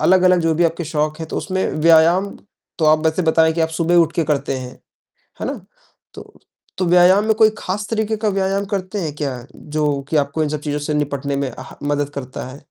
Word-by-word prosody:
अलग-अलग 185 -1 +4
जो 165 -1 +1
भी 170 +2 +2
आपके 165 +1 -1
शौक 155 +1 -2
हैं, 160 - -5
तो - - -5
उसमें 190 -1 -2
व्यायाम 165 +5 +4 0.5
तो 160 - +1
आप 155 0 +5
वैसे 160 +3 +1
बताएँ 160 0 +3
कि 165 - -3
आप 160 - +2
सुबह 165 +1 0
उठकर 165 -1 +2
करते 145 -3 -1
हैं। 125 -1 -8 0.7
है - - -3
ना? - - -5 0.5
तो - - -12 0.4
तो 185 - 0
व्यायाम 180 +4 +5
में 220 - +3
कोई 220 0 +5
ख़ास 200 +2 -4
तरीक़े 220 -1 -1
का 215 0 0
व्यायाम 195 +1 -1
करते 195 0 -3
हैं 155 -3 -3
क्या? 130 -5 -4
जो 150 -2 -2
कि 155 - +1
आपको 145 +2 0
इन 150 - -1
सब 150 -1 -3
चीज़ों 150 -1 -3
से 150 +1 -3
निपटने 140 -1 -2
में 140 -2 -2
आह 130 +1 -10
मदद 145 -1 0
करता 130 -2 -6
है। 130 +3 -11
160 Hz, 215 wpm, -19 LUFS, 145-185 Hz, 0.7 s, आप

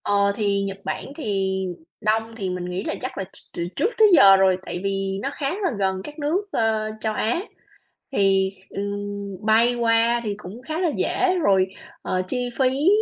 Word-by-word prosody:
Ờ, 200 0 +3
thì 200 -2 +1
Nhật 195 0 -3
Bản - - -3
thì 195 -8 -1 0.4
đông 225 +1 +1
thì 195 -4 -2
mình 180 -1 -3
nghĩ 180 +2 -3
là - - -2
chắc 255 - -5
là 195 - -1
ch - - -11 0.2
từ 170 0 -1
trước 420 - +2
tới 440 - +7
giờ 195 -9 +9
rồi, 190 -1 +4
tại 175 - -4
vì 195 0 -1
nó 275 - -1
khá 275 -2 -2
là 375 +1 -1
gần 190 -1 0
các 295 +7 -9
nước, 305 +6 +1
ờ, 220 -4 +1
châu 215 0 -1
Á, 230 +10 0 0.7
thì, 195 -4 +3 0.2
ừm, 200 0 -5
bay 230 +3 +4
qua 235 0 +3
thì 210 -2 -1
cũng 210 +4 -10
khá 315 +5 -3
là 355 -3 +2
dễ 370 0 +1
rồi, 190 -6 +4 0.4
ờ, 185 - -1
chi 250 +2 -1
phí, 265 +4 +2
210 Hz, 195 wpm, -23 LUFS, 195-245 Hz, 0.7 s, giờ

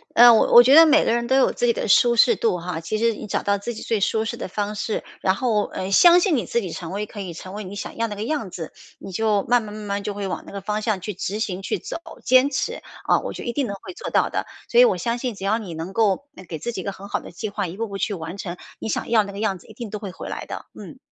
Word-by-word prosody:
呃， 240 +1 +9
我 220 - +3
我 240 - +11
觉 260 +3 +5
得 325 +2 +10
每 310 - +5
个 - - +2
人 235 0 0
都 260 - +2
有 265 - +4
自 - - -1
己 235 - +3
的 - - -3
舒 235 +4 +5
适 235 +1 +5
度 220 -6 +1
哈， 175 -1 -4
其 170 +6 -3
实 230 +1 +2
你 210 - -8
找 - - -2
到 200 0 +2
自 220 +4 -5
己 220 - -8
最 225 - 0
舒 220 +2 +1
适 235 +1 -4
的 - - -5
方 205 +2 -3
式， 215 +1 -2 0.2
然 190 - +2
后， 215 -2 +1
呃， 190 +1 -5
相 345 - +7
信 355 -3 +2
你 245 - -1
自 235 - 0
己 185 -5 -5
成 165 0 -6
为 205 +2 -3
可 210 - -10
以 185 -4 -5
成 185 +3 -9
为 210 +1 -5
你 195 +1 -8
想 205 - -6
要 230 0 0
那 210 - -6
个 205 - -4
样 250 -5 -2
子， 165 -3 -7 0.2
你 - - -9
就 210 +1 +1
慢 245 0 +3
慢 210 -1 -8
慢 215 0 -7
慢 200 0 -3
就 205 0 -3
会 200 -1 -4
往 185 - -4
那 - - -9
个 200 - -5
方 210 +2 -2
向 215 -3 0
去 210 +3 -4
执 195 +2 -4
行， 195 -4 -2
去 195 - -2
走， - - -6 0.3
坚 255 +2 +5
持， 290 - -2 0.2
啊， - - +3
我 - - -5
就 - - -7
一 240 - -3
定 275 -1 0
能 200 - -4
会 - - -9
做 - - -6
到 - - +2
的！ - - -2 0.2
所 475 - +4
以 - - +9
我 465 - +2
相 235 -1 -1
信 245 -2 -3
只 195 - -10
要 210 +3 +2
你 195 -7 -7
能 165 +4 -6
够， 220 +5 +1
呃， - - -11
给 160 -1 -6
自 240 +10 -4
己 205 - -5
一 - - -8
个 200 - -3
很 195 +1 -11
好 - - -1
的 - - -11
计 215 - -5
划， 200 -1 -3
一 175 +3 -8
步 230 +1 -2
步 200 -1 -6
去 205 - -1
完 165 +2 -7
成， 180 -3 -5 0.2
你 - - -4
想 - - -2
要 225 -2 +4
那 200 - -7
个 200 - -8
样 205 -3 0
子 - - -19
一 220 - -13
定 230 0 -7
都 210 - -4
会 200 -2 -6
回 - - -8
来 - - -5
的。 - - -7
嗯。 - - -11
210 Hz, 350 characters per minute, -23 LUFS, 195-235 Hz, 0.3 s, 我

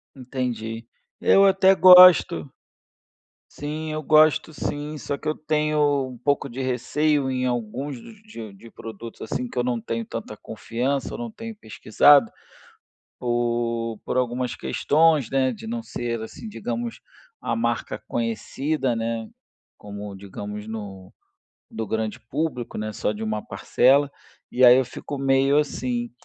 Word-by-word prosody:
Entendi. 120 -3 -5 0.3
Eu 195 - +5
até 190 0 +5
gosto. 180 - +7 1.0
Sim, 155 +2 -5
eu 155 0 -3
gosto 155 +1 +4
sim, 150 0 -4
só 145 - -4
que 140 - -9
eu 155 - 0
tenho 150 -3 +1
um 125 -1 -10
pouco 140 +2 -1
de 125 +2 -8
receio 135 +3 0
em 130 -1 -1
alguns 125 +3 -3 0.3
de 115 - -9
de 105 +4 -15
produtos 115 +1 -10
assim 125 +3 -3
que - - -13
eu - - +1
não 120 -1 -1
tenho 115 0 -4
tanta 110 -1 -7
confiança 120 +5 -3
ou - - -6
não 240 -1 -4
tenho 225 0 -8
pesquisado, 135 - +4 0.9
por 120 -2 -2
por - - -3
algumas 125 -1 -1
questões, 150 - +2
né, 130 -1 +1
de 220 +1 -9
não 235 0 -4
ser 120 -1 -4
assim 110 - -8
digamos, 120 - -5 0.4
a - - -2
marca 115 +1 -2
conhecida, 130 +3 -2
né, 115 0 -3 0.5
como 100 -1 -8
digamos 100 +2 -8
no 100 -4 -8 0.6
do 110 -1 -5
grande 110 +1 -3
público, 140 -4 -3
né, 110 0 -4
só 105 - -1
de 105 +1 -6
uma 110 -1 -2
parcela. 140 +2 +2 0.4
E 130 - +1
aí 125 0 +9
eu 130 - +2
fico 140 +3 -7
meio 135 +1 +2
assim. 125 -5 -2
125 Hz, 145 wpm, -23 LUFS, 115-145 Hz, 1.0 s, aí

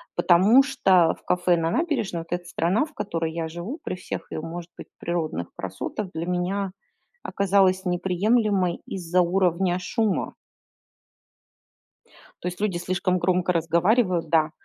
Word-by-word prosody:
Потому 200 +10 +5
что 185 - +3
в - - -30
кафе 180 -1 +2
на 165 0 0
набережной 265 - -1
вот 165 - -12
эта 175 0 -2
страна, 180 - +1
в 310 - -17
которой 165 -4 -3
я 165 -1 -3
живу, 180 - -6
при - - -3
всех 180 - -7
её, - - -4
может 170 +1 -7
быть, - - -9
природных 160 - -2
красотах, 95 - -5
для 160 +1 -3
меня 185 +2 -1 0.5
оказалась 190 -1 +2
неприемлемой 190 +1 +1
из-за 180 -1 0
уровня 180 0 +1
шума. 210 -1 -1 2.1
То 180 - -1
есть 180 +2 -8
люди 200 -5 0
слишком 185 +1 0
громко 180 0 +1
разговаривают. 170 +2 +2
Да, 160 -1 +3
180 Hz, 140 wpm, -24 LUFS, 170-195 Hz, 2.1 s, Потому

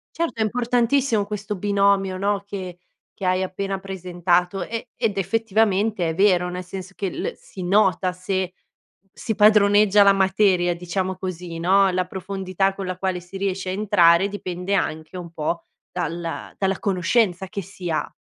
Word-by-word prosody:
Certo, 335 -9 -2
è - - +5
importantissimo 240 0 +1
questo 210 0 -4
binomio, 200 -1 +2
no, 200 +1 0
che 185 -3 -6 0.4
che 190 - -3
hai 185 +1 +2
appena 195 +1 -3
presentato, 180 -1 -1
e 230 +2 -5
ed 220 -4 -1
effettivamente 210 -2 +1
è 160 - -2
vero, 185 -2 +3
nel 180 0 -5
senso 190 +1 -8
che 195 -3 -3
l - - -3
si 185 - -10
nota 185 -1 +2
se 185 0 -2 0.6
si 220 - -4
padroneggia 210 -1 +6
la 200 0 +6
materia, 190 -2 +2
diciamo 185 +2 -3
così, 180 -2 -6
no, 195 +3 +4
la 185 0 0
profondità 190 +1 -2
con 195 -1 -6
la 185 0 -4
quale 185 -1 -1
si 180 +2 -14
riesce 190 -1 -2
a - - -1
entrare 195 -2 +4
dipende 185 -1 -4
anche 160 -1 -2
un 170 -2 -8
po' 165 +1 -3 0.3
dalla 170 -1 -4
dalla 195 -1 0
conoscenza 190 0 +1
che 200 - -4
si 185 -1 -8
ha. 155 - -1
190 Hz, 160 wpm, -23 LUFS, 180-200 Hz, 0.6 s, padroneggia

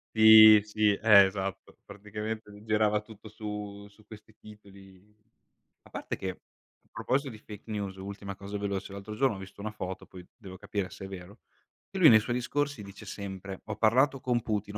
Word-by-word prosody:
Sì, 110 -1 +9
sì, 105 0 +1
eh, 105 -1 +6
esatto. 95 0 -5
Praticamente 105 +1 -7
gli 105 0 -14
girava 105 -1 +1
tutto 110 0 -14
su 105 -1 -7
su 105 +1 -23
questi 110 0 -14
titoli. 100 -1 -17 0.7
A - - -19
parte - - -5
che, 95 -1 -6 0.5
proposito 135 +2 -1
di 110 - -10
fake 105 0 -12
news, 100 -2 -4
ultima 100 +1 -7
cosa 100 +2 -7
veloce: 100 -1 -4
l'altro 100 +2 -8
giorno 130 0 +1
ho - - -9
visto 95 +1 -11
una 110 +1 -4
foto, 95 -3 -7
poi 90 -1 -13
devo 95 -6 -11
capire 100 0 -4
se 95 - -10
è - - -7
vero, 95 +3 -11 0.5
che 195 - -6
lui 165 -5 +8
nei 110 - +7
suoi 120 +3 -3
discorsi 145 0 -2
dice 100 0 -12
sempre: 95 -1 -7
"Ho 110 - -5
parlato 130 +6 +2
con 120 -2 0
Putin, 105 -1 -3
105 Hz, 185 wpm, -29 LUFS, 100-110 Hz, 0.7 s, Sì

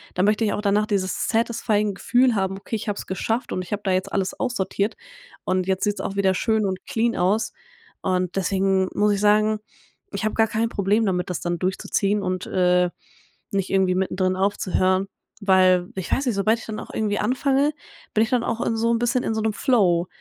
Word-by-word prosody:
dann 180 - +2
möchte 210 +2 +2
ich 210 - +1
auch - - -2
danach 205 +1 +2
dieses 195 -3 -1
satisfying 220 -3 +1
Gefühl 245 +4 +2
haben: 195 0 -1
„Okay, 210 - -5
ich 215 - -4
habe 205 - -2
es - - -7
geschafft 225 +6 -2
und 185 - -2
ich 180 - -10
habe 205 0 -2
da 190 - +1
jetzt 185 0 0
alles 190 -1 -1
aussortiert 205 -3 -1 0.5
und 185 0 0
jetzt 190 +1 0
sieht's 205 -2 -1
auch 200 +1 -4
wieder 190 -1 +3
schön 220 +1 +1
und 190 -1 -3
clean 230 0 0
aus“, 205 +5 +1 0.5
und 185 -1 -1
deswegen 190 0 +1
muss 210 0 +2
ich 200 - -2
sagen, 215 +1 +3 0.5
ich - - -2
habe 215 - 0
gar 225 0 +3
kein 220 +2 0
Problem 210 +1 +1
damit, 180 -2 -1
das 180 - -2
dann 175 -1 -2
durchzuziehen 195 +2 0
und, 185 0 -2
äh, 180 -1 +2 0.6
nicht 195 -1 0
irgendwie 190 -1 +2
mittendrin 185 0 0
aufzuhören, 190 -1 +1 0.3
weil 185 -2 +4
ich 190 -2 -5
weiß 275 - +1
nicht, 240 -5 0
sobald 215 +3 +2
ich - - -10
dann 215 -1 -5
auch - - -9
irgendwie 210 -1 -1
anfange, 275 +3 +1 0.4
bin 220 - +4
ich 225 - -2
dann 245 -2 +1
auch 230 +1 -2
in 225 - 0
so 230 +1 +1
'n 230 - +2
bisschen 240 +1 +1
in 220 - -1
so 220 - -1
'nem 220 -1 0
Flow 185 -9 +2
200 Hz, 215 wpm, -23 LUFS, 185-220 Hz, 0.6 s, weil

